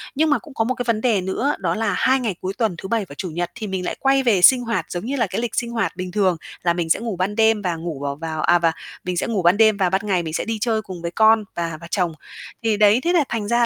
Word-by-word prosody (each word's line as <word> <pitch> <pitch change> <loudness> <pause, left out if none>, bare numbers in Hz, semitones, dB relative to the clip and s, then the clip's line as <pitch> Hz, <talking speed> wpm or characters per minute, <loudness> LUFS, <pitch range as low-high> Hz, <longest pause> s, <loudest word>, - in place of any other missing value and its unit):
Nhưng 310 +3 +2
mà 290 -5 +3
cũng 295 +2 -14
có 225 - 0
một 255 +3 -1
cái 245 - -3
vấn 220 -2 +1
đề 220 -6 +2
nữa 225 +10 -1
đó 175 -3 -1
là 215 -2 0
2 265 +1 +3
ngày 220 -7 -2
cuối 190 +1 -3
tuần 220 -5 -1
thứ 190 - -7
Bảy 225 -4 0
và 140 - -10
Chủ 185 - -4
nhật 175 +2 -3
thì 220 -4 -5
mình 190 -2 -3
lại - - -2
quay 270 0 +3
về 215 -7 +3
sinh 250 +7 +7
hoạt 230 -1 -2
giống 175 +4 -4
như 275 - -2
là 250 - +1
cái - - -3
lịch 240 - -3
sinh 235 -1 -1
hoạt 195 -8 -1
bình 180 0 -5
thường 190 -3 +1 0.3
là 170 - +2
mình 170 -1 -3
sẽ - - +3
ngủ 230 -3 -4
ban 185 +3 -2
đêm 220 -1 +3
và 180 -4 -1
ngủ 160 -3 -5
vào 140 0 -3
vào 160 +1 -4
à, 175 +2 +4
và 165 -1 +2 0.3
mình 180 -1 -3
sẽ - - -1
ngủ 215 -5 -1
ban 175 +3 +4
đêm 220 -2 +5
và 185 -2 +2
ban 190 +2 0
ngày 185 -3 +1
mình 160 -1 -5
sẽ - - -2
đi 225 0 -2
chơi 220 -1 +1
cùng 185 -5 -9
với 170 0 -4
con 220 +3 +4
và 165 -2 -3
và 170 - -9
chồng. 180 -4 +1 0.5
Thì 220 -2 +1
đấy, 210 +3 +5
thế 350 +1 +1
là 335 - +4
thành 220 -3 -2
ra 235 +1 +3
205 Hz, 315 wpm, -21 LUFS, 175-230 Hz, 0.5 s, sinh